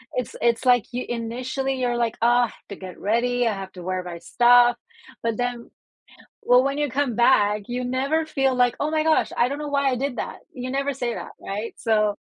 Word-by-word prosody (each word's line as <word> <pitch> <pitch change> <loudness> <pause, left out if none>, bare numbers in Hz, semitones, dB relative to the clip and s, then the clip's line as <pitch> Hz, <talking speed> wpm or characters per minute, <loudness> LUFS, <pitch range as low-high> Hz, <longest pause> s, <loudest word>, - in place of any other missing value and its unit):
it's 250 - -3
it's, 235 +2 +1
like, 245 -3 +4
you 250 - -3
initially 250 +3 -3
you're, 245 -1 0
like, 235 -2 0
"Ugh, 240 0 +4
have - - -19
to 200 - -6
get 185 -2 -10
ready, 240 +3 +1
I 220 - +1
have 195 -1 -7
to 180 - -10
wear 185 +1 -2
my 175 -1 -7
stuff," 240 +5 +4 0.4
but 230 -2 -1
then 245 -1 -3 0.8
well, 250 +1 +6
when 275 +1 -1
you 295 -1 0
come 260 -2 -1
back, 210 -4 +3
you 245 +1 -3
never 275 +6 0
feel 270 -4 0
like, 245 -1 +3
"Oh 300 - -1
my 310 -1 +1
gosh, 315 -1 +2
I 240 +2 +3
don't 280 - -3
know 300 - -4
why 280 -1 +2
I - - 0
did 265 -1 -3
that," - - -4 0.2
you 255 0 -5
never 275 +1 -1
say 245 -2 -2
that, - - -7
right, 210 +3 -5
so 215 -2 +1
245 Hz, 220 wpm, -23 LUFS, 230-265 Hz, 0.8 s, well